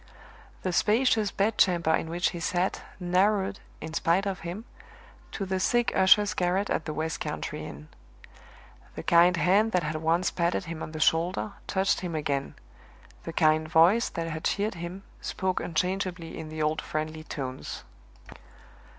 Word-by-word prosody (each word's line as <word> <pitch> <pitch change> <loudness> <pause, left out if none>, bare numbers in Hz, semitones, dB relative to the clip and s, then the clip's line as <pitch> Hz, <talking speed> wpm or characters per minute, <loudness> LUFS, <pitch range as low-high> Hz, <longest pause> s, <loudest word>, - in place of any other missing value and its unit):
The 185 - -1
spacious 220 +1 +3
bed 210 +3 0
chamber 170 -4 +3
in 160 - 0
which 175 +1 0
he 170 - -6
sat, 180 +2 -1 0.2
narrowed, 190 +2 +1 0.2
in 160 0 -6
spite 170 +4 +2
of 195 -2 -2
him, 175 +7 -6 0.7
to 195 - -4
the 190 0 -1
sick 240 +5 +2
usher's 200 +1 +5
garret 185 +3 0
at - - -1
the 155 - -3
west 160 0 -2
country - - -4
inn. 75 +2 -10 1.1
The - - -6
kind 175 +1 +5
hand 200 +6 +3
that 180 -2 +2
had 155 +1 -2
once 165 +3 +1
patted 170 +2 0
him 165 -1 -6
on 155 - -6
the 155 - -5
shoulder 175 +6 +1
touched 190 0 +1
him 175 -3 -4
again; 140 -3 -2 0.7
the 165 - -5
kind 155 -1 +3
voice 175 +9 +5
that 165 - -4
had 160 -1 -5
cheered 210 +2 0
him 175 +3 -7 0.2
spoke 185 -1 -1
unchangeably 180 0 -2
in 155 - -7
the 155 0 -3
old 155 +1 0
friendly 155 0 -4
tones. 130 -4 -6
175 Hz, 160 wpm, -27 LUFS, 160-190 Hz, 1.1 s, usher's